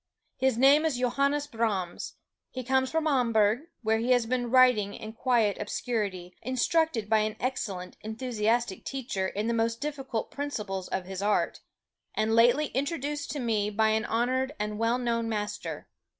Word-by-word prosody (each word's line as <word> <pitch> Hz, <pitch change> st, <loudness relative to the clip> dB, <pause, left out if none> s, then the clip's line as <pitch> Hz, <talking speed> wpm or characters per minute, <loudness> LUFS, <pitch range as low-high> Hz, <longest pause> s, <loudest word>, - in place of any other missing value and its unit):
His 265 Hz, -3 st, +2 dB
name 275 Hz, +4 st, +6 dB
is 315 Hz, -6 st, 0 dB
Johannes 280 Hz, +4 st, +1 dB
Brahms; 215 Hz, -9 st, -2 dB, 0.3 s
he 255 Hz, -, -6 dB
comes 260 Hz, +1 st, +2 dB
from 320 Hz, +1 st, 0 dB
Hamburg, 230 Hz, -6 st, +3 dB, 0.2 s
where 220 Hz, 0 st, +2 dB
he 245 Hz, +3 st, +3 dB
has 245 Hz, -2 st, +2 dB
been 245 Hz, 0 st, -1 dB
working 250 Hz, -5 st, +4 dB
in 220 Hz, 0 st, -8 dB
quiet 230 Hz, -4 st, +2 dB
obscurity, 205 Hz, -5 st, -3 dB
instructed 255 Hz, 0 st, +1 dB
by 220 Hz, 0 st, +4 dB
an 215 Hz, 0 st, -1 dB
excellent, 195 Hz, -8 st, -3 dB
enthusiastic 220 Hz, -1 st, -1 dB
teacher 235 Hz, -8 st, -3 dB
in 205 Hz, +3 st, -3 dB
the 235 Hz, -, 0 dB
most 230 Hz, 0 st, 0 dB
difficult 270 Hz, -6 st, -4 dB
principles 210 Hz, -10 st, -4 dB
of 190 Hz, -1 st, -3 dB
his 190 Hz, 0 st, -5 dB
art, 210 Hz, +1 st, +1 dB, 0.6 s
and 215 Hz, +1 st, +1 dB
lately 245 Hz, +6 st, +4 dB
introduced 290 Hz, +1 st, -2 dB
to 295 Hz, -, -3 dB
me 220 Hz, -4 st, 0 dB
by 220 Hz, +1 st, +2 dB
an 220 Hz, 0 st, +1 dB
honored 255 Hz, +5 st, 0 dB
and 210 Hz, 0 st, -3 dB
well 230 Hz, +2 st, +2 dB
known 230 Hz, -2 st, -1 dB
master. 210 Hz, -1 st, -4 dB
230 Hz, 160 wpm, -28 LUFS, 215-260 Hz, 0.6 s, name